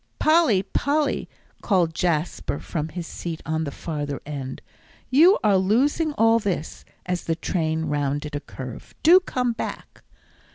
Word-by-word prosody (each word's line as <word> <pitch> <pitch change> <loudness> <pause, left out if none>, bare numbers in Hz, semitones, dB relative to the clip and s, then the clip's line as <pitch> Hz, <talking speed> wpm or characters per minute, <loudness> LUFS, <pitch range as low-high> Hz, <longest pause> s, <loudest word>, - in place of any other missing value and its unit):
"Polly, 310 - +4
Polly," 295 +6 0 0.3
called 180 -6 +2
Jasper 160 -3 -1
from 155 0 -4
his 175 +1 -6
seat 165 0 -6
on 160 0 -1
the 140 - -4
farther 145 -2 -4
end, 140 -3 -5 0.5
"you 330 +9 +7
are 200 -3 +4
losing 270 - +2
all 225 -2 +4
this," 195 -7 -3 0.2
as 180 -1 -2
the 165 - 0
train 160 -1 -1
rounded 145 0 -2
a - - -1
curve. 130 -4 -9
"Do 345 +4 +8
come 250 -9 -1
back." 225 - -7
175 Hz, 140 wpm, -24 LUFS, 150-235 Hz, 0.5 s, Do